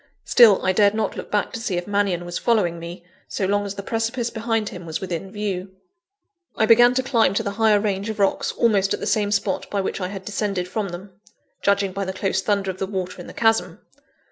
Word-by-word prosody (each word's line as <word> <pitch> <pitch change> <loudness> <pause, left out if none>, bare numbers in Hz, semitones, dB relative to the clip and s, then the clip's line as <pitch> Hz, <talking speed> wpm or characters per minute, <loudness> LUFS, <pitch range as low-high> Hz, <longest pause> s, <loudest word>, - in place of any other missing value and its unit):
Still, 220 -6 +6
I 185 - +4
dared 200 +2 +3
not 215 -2 -1
look - - -7
back 205 -1 -1
to - - -4
see 200 -6 -2
if 175 - -3
Mannion 200 -4 0
was 175 0 -4
following 190 -8 +1
me, 170 +1 -9 0.2
so 195 - -2
long 205 +1 0
as 200 - -6
the 200 - -6
precipice 230 +2 -2
behind 225 -1 -1
him 175 -1 -9
was 160 - -3
within 185 0 -5
view. 195 -3 -4 0.8
I 220 - +2
began 240 +2 +6
to 260 - +1
climb 230 -7 +2
to 225 - +1
the 200 - -2
higher 215 0 +3
range 200 0 -2
of 220 - -4
rocks 200 -1 +1
almost 200 -4 +2
at - - -11
the - - -4
same 210 -2 +1
spot 200 -1 -1
by 205 - -1
which 190 - -3
I 180 - -1
had 190 0 -8
descended 200 -3 -2
from 200 +1 -3
them 185 +2 -10 0.4
judging 200 -1 +2
by 195 +1 -3
the 190 - -4
close 190 0 -1
thunder 200 -1 0
of 185 - -12
the 195 - -2
water 185 -2 -4
in - - -10
the - - -10
chasm. 225 -1 +1
200 Hz, 235 wpm, -22 LUFS, 190-220 Hz, 0.8 s, Still